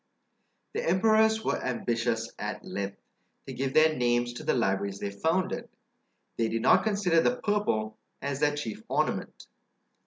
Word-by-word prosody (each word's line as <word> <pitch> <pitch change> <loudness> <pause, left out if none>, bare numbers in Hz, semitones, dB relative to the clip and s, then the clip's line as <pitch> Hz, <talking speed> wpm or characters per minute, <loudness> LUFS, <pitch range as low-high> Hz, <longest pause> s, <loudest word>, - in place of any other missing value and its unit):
The - - -2
emperors 220 +4 +3
were - - -1
ambitious, 115 -2 -1
at 105 +1 -5
length, 100 0 -4 0.5
to 135 - -7
give 130 +2 -3
their 155 0 +6
names 120 0 +1
to 120 - -8
the - - +1
libraries 100 -3 0
they 100 0 -4
founded; 185 - -1 0.7
they 115 -1 +1
did 115 0 -2
not - - +5
consider 200 -6 +2
the 245 - +2
purple 205 - -1 0.2
as 140 0 -3
their 145 0 +2
chief 120 -8 -5
ornament. - - -1
130 Hz, 150 wpm, -28 LUFS, 115-185 Hz, 0.7 s, their